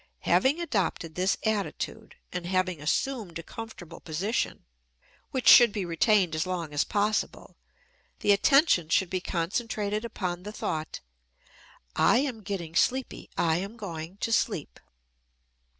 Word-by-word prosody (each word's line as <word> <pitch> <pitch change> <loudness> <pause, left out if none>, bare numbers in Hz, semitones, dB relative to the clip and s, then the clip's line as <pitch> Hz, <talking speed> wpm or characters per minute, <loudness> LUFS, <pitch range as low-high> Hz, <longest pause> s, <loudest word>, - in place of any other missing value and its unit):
Having 275 +5 +3
adopted 195 - -1
this 185 +3 +1
attitude, 220 - -3 0.2
and 175 -1 -4
having 185 -3 0
assumed 205 - -1
a 165 - -7
comfortable 180 -6 -9
position, 190 +9 -2 0.6
which 260 -2 -3
should 240 -3 +9
be 200 -2 -3
retained 180 +1 +2
as 155 +3 -1
long 170 -5 -3
as 145 - +2
possible, 210 0 -1 0.7
the 205 - +3
attention 200 - +4
should 180 +2 +2
be 185 -1 -1
concentrated 210 +4 -2
upon 180 -6 -4
the 205 +3 -7
thought, 155 -6 -4 0.9
"I - - +4
am 255 -4 -1
getting 185 -5 -5
sleepy, 260 +9 0
I 160 -1 +2
am 200 +6 -5
going 175 -4 -7
to 230 - 0
sleep." 200 -10 -1
195 Hz, 135 wpm, -28 LUFS, 170-225 Hz, 0.9 s, should